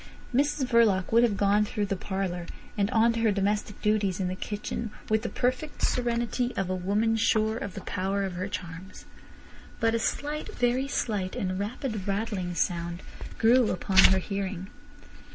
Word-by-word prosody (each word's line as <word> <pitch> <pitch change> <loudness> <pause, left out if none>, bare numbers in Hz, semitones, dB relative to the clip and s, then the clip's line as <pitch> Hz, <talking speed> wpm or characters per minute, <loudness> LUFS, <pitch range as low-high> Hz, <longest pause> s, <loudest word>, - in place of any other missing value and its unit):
Mrs 285 +1 +2
Verloc 225 -6 +3
would 230 +1 +6
have 225 -4 +2
gone 205 +1 +3
through 210 0 -2
the 195 -1 -1
parlour 185 -2 -3 0.3
and 200 -1 +1
on 230 +1 +4
to 230 - -2
her 225 -2 +3
domestic 205 +1 -1
duties 205 -3 +1
in 185 -2 0
the 185 - -3
kitchen 210 +3 -4 0.2
with 220 0 +3
the - - -3
perfect 255 +4 -2
serenity 240 0 0
of 190 -1 -1
a - - 0
woman 205 +5 +1
sure 220 0 +2
of 200 -4 -5
the - - -5
power 195 +1 -1
of 190 -2 -3
her 185 +2 -3
charms. 180 -1 -7 0.7
But 225 0 +2
a 230 - +1
slight, 295 +6 -3
very 250 +2 +1
slight, 205 -9 -2
and 185 0 -2
rapid 215 -1 -3
rattling 195 -3 -2
sound 170 +1 -1 0.3
grew 235 +1 +5
upon 190 +1 +2
her 190 - +6
hearing. 195 -1 -3
205 Hz, 170 wpm, -28 LUFS, 190-230 Hz, 0.7 s, would